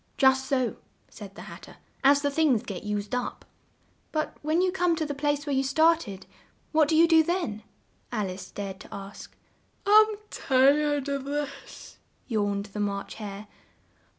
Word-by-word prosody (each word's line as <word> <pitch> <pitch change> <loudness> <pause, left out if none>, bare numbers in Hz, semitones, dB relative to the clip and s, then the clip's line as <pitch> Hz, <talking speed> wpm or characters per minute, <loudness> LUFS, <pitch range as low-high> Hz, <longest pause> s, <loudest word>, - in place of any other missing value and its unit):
"Just 265 -1 +4
so," 255 -3 0 0.3
said - - -11
the - - -9
Hat - - -10
ter; - - -14 0.3
"as 285 +1 +5
the 285 - +1
things 280 -7 +2
get 200 -6 -6
used 210 0 -3
up." 250 0 -3 0.7
"But 310 -1 -2
when 310 +3 +1
you 370 0 +2
come 355 -2 +1
to 315 - -2
the 290 - -3
place 290 0 -1
where 290 - -1
you 265 - +3
started, 275 - +2 0.5
what 310 -1 +4
do 315 - +1
you 330 +2 +6
do 325 -1 +6
then?" 315 - -2 0.5
Al 215 -5 -1
ice 185 +1 -9
dared 195 -2 -6
to - - -13
ask. 200 0 -9 0.5
"I'm 430 +1 +6 0.2
tired 285 +2 +3
of 280 -1 -2
this," 290 0 -6 0.3
yawned 205 -3 -1
the 210 - -5
March 200 -1 -2
Hare. 205 0 -7
275 Hz, 170 wpm, -27 LUFS, 210-310 Hz, 0.7 s, you